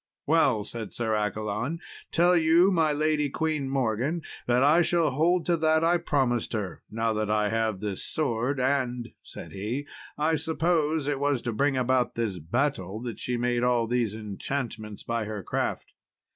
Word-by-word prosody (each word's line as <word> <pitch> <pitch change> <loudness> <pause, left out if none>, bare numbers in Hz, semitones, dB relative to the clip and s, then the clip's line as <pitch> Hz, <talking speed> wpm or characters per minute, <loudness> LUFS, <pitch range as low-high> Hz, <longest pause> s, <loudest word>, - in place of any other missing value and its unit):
"Well," 135 -8 +3
said 110 0 -7
Sir 115 -2 -1
Accolon, 105 - -2 0.3
"tell 175 +2 +4
you 170 +3 +5
my 160 -4 +3
lady 150 0 +1
Queen 155 -2 -1
Morgan, 135 +5 0 0.2
that 125 +1 +3
I 155 +5 +5
shall 170 -3 +2
hold 165 +5 +2
to 170 -1 +2
that 160 0 +3
I 170 +1 +4
promised 130 -9 0
her, 100 -5 -3
now 115 0 0
that 110 -1 -1
I 105 -1 +2
have 110 -3 -1
this 105 -3 -3
sword 130 -2 -1
and," 125 -3 0
said - - -10
he, 110 +9 -3 0.3
"I 155 +2 +2
suppose 160 -1 +1
it 145 -2 0
was 140 -3 0
to 120 - -2
bring 140 +4 +1
about 130 0 +1
this 110 -6 -2
battle 100 - -1
that 120 -2 -5
she 125 -1 -2
made 120 0 0
all 120 -2 +2
these 115 -3 0
enchantments 110 0 -5
by 115 -2 -2
her 105 -2 -5
craft." - - -3
125 Hz, 170 wpm, -27 LUFS, 110-155 Hz, 0.3 s, you